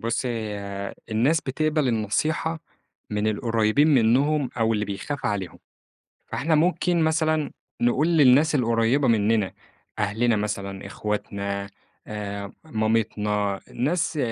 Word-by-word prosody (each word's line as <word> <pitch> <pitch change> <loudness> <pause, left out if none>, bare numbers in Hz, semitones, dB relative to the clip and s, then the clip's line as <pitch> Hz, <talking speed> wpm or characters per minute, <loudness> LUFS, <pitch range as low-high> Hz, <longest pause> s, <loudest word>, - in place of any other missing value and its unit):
بُص 115 +3 -1
هي 100 -4 -4 0.2
الناس 130 +9 +2
بتقبل 150 +1 0
النصيحة، 155 +9 0 0.5
من 105 0 -1
القريّبين 115 +7 +2
منهم 135 +4 +3
أو 115 0 +2
اللي 105 -1 0
بيخاف 100 +8 -4
عليهم، 100 -4 -3 0.7
فإحنا 160 +2 0
ممكن 175 +2 +2
مثلًا 155 -1 +1 0.3
نقول 125 +6 +2
للناس 150 -1 +5
القريّبة 120 +1 +2
مننا، 110 -3 +2 0.5
أهلنا 110 +3 +1
مثلًا 100 -2 -4
إخواتنا 100 -1 -3 0.4
آآ 100 -1 -5
مامتنا، 105 -5 0
ناس 160 +4 0
115 Hz, 105 wpm, -24 LUFS, 105-145 Hz, 0.7 s, للناس